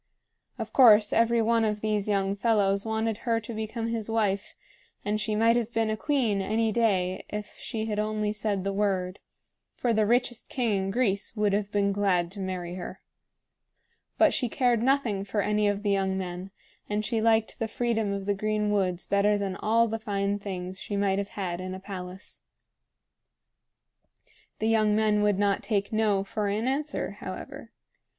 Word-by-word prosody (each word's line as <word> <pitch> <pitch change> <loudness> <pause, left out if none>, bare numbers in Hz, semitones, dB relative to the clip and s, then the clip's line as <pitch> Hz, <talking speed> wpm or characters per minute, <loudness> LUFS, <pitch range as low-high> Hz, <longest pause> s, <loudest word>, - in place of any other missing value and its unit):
Of - - -6
course 215 -5 +7
every 230 0 +3
one 230 0 +2
of 210 -1 -1
these 210 -2 0
young 195 -1 +1
fellows 200 -1 +1
wanted 220 0 -1
her 230 -1 0
to 230 +2 -7
become 220 +1 -3
his 225 -2 -3
wife; 205 -3 0 0.5
and 210 +1 0
she 215 0 -1
might 230 +2 +4
have 240 -1 -1
been 225 -1 0
a - - 0
queen 230 -5 +1
any 220 +3 +1
day 190 -5 +1
if 210 0 -6
she 220 -1 -3
had 210 -1 -2
only 215 0 -1
said 210 -3 -2
the 195 0 -1
word, 195 -2 -1 0.6
for 240 -2 0
the 215 -1 +2
richest 240 0 0
king 215 -7 0
in - - -2
Greece 200 -2 0
would 210 -2 +1
have 205 0 -1
been 200 -1 +2
glad 190 -4 +1
to 200 - -9
marry 185 -2 -4
her. 180 -1 -7 1.2
But - - +5
she 245 - 0
cared 240 -1 +2
nothing 245 -6 +1
for 205 +1 -3
any 210 0 +1
of 205 0 -1
the 205 - +1
young 190 -1 +1
men, 180 0 -5 0.4
and 210 +1 -1
she 225 0 0
liked 225 +1 +2
the 225 - -1
freedom 225 -3 -1
of 200 -1 -3
the 205 - +1
green 210 +1 -1
woods 185 -3 0
better 205 +1 +2
than 195 -2 -2
all 230 +3 +2
the 225 0 -3
fine 200 -2 -1
things 185 -2 -5
she 205 - -4
might 200 -1 +1
have 200 0 -3
had 180 -3 -3
in 185 0 -5
a - - -7
palace. 190 -1 -8 2.2
The 220 - -1
young 215 -2 +3
men 215 -1 +2
would 205 -2 +2
not 200 0 +1
take 200 -1 -1
"No!" 210 -3 +2
for 205 +1 -3
an 210 +4 -1
answer, 290 +3 -2
however. - - -8
210 Hz, 185 wpm, -27 LUFS, 195-225 Hz, 2.2 s, course